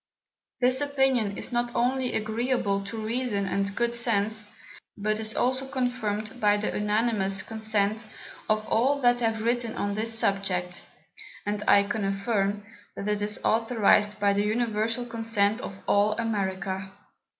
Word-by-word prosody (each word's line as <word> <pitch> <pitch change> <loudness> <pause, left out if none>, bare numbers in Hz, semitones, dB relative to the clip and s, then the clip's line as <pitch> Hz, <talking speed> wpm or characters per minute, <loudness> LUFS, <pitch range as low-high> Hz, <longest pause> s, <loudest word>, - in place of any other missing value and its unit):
This 255 +2 +3
Opinion 265 -7 +1
is - - -3
not 240 0 -1
only 255 +1 0
agreeable 220 -2 0
to 225 +3 -6
Reason 230 -3 -1
and 200 +1 -1
good 235 0 0
Sense, 220 -2 0 0.5
but 215 +1 -1
is 220 0 -2
also 260 +2 +1
confirmed 245 -4 -2
by 205 -1 +4
the 210 - -2
unanimous 210 -2 +1
Consent 220 -1 -1 0.4
of 215 0 +1
all 265 +7 +2
that 245 -1 +4
have 225 -2 0
written 235 -1 0
on 205 0 -1
this 225 +2 0
Subject; 185 -4 -1 0.6
and 205 0 -2
I 200 - +6
can 210 +1 -3
affirm, 200 0 -1 0.3
that 200 - -5
it 210 0 0
is 210 0 0
authorized 215 -2 +3
by 200 0 +3
the 200 - +1
universal 225 +2 0
Consent 225 -2 +1
of 195 - -7
all 205 +1 +3
America. 195 -3 -2
215 Hz, 145 wpm, -27 LUFS, 205-235 Hz, 0.6 s, I